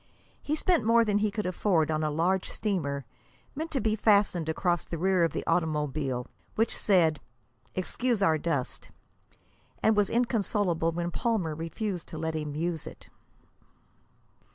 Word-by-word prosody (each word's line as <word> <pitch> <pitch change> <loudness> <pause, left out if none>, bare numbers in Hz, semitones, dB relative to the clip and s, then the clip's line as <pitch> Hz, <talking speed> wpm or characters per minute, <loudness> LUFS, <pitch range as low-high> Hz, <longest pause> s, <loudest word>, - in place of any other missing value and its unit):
He 300 - -1
spent 340 -4 +2
more 230 +1 +4
than 205 -1 +2
he 215 0 +2
could 210 +1 -3
afford 180 -3 +1
on 155 0 0
a 155 - +1
large 175 +5 +1
streamer, 140 - -2 0.5
meant 320 +3 -4
to 280 - 0
be 220 -3 +1
fastened 200 -6 +3
across 175 +1 0
the 170 - -5
rear 185 +1 +2
of 165 - +2
the - - -4
automobile, 150 -6 0 0.3
which 225 +1 +1
said, 165 -7 +3 0.6
"Excuse 235 +5 0
our 160 -6 +3
dust," 145 -6 -2 0.9
and 220 - +4
was 205 -2 +3
inconsolable 205 -8 +1
when 175 +1 -3
Palmer 200 -7 0
refused 165 +4 -4
to 160 - -8
let 160 +1 -2
him 150 -2 -3
use 165 0 -2
it. - - -12
175 Hz, 155 wpm, -28 LUFS, 160-210 Hz, 0.9 s, more